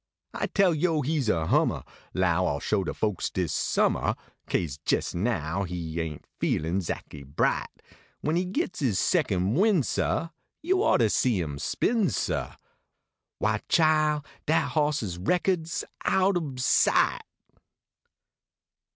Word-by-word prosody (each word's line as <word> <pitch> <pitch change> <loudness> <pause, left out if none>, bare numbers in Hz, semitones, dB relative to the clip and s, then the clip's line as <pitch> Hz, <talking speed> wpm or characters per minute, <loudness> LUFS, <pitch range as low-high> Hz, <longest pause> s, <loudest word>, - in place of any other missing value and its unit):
I - - -2
tale 195 -4 +3
yo 155 -1 +1
he 155 +3 0
s 130 - -1
a 80 -6 +1
hummah, - - +1 0.3
Low 90 -1 +2
I - - +1
ll 70 - -3
show 105 -3 0
de - - -3
folks 105 -5 -1
dis 90 -5 -2
sumniah, 70 - +1 0.3
Kase 75 -5 -2
jes - - +1
now 90 -3 -1
he 85 -3 -3
aint 75 -3 -6
feelin 85 +5 0
zackly 75 -5 -6
bright, 70 +1 0 0.5
When 155 +2 0
he 180 +2 +1
gets 180 -2 -3
is 120 -9 +1
second 100 - +1
win 190 - +3
sah, 165 +6 -1 0.3
Yo 375 +3 +2
ought 135 - +3
to 110 - +4
see 120 -7 +2
him 75 -4 -4
spin, 220 - +1
sah, - - -2 0.8
Why, - - 0
chile, 155 -2 +3 0.3
dat 160 +2 +2
hoss 150 -3 +1
s 90 -4 -4
reckod 175 - 0
s 165 - -3 0.2
out 190 +1 +2
ob 145 -7 -3
sight. 125 - +3
120 Hz, 150 wpm, -27 LUFS, -, 0.8 s, to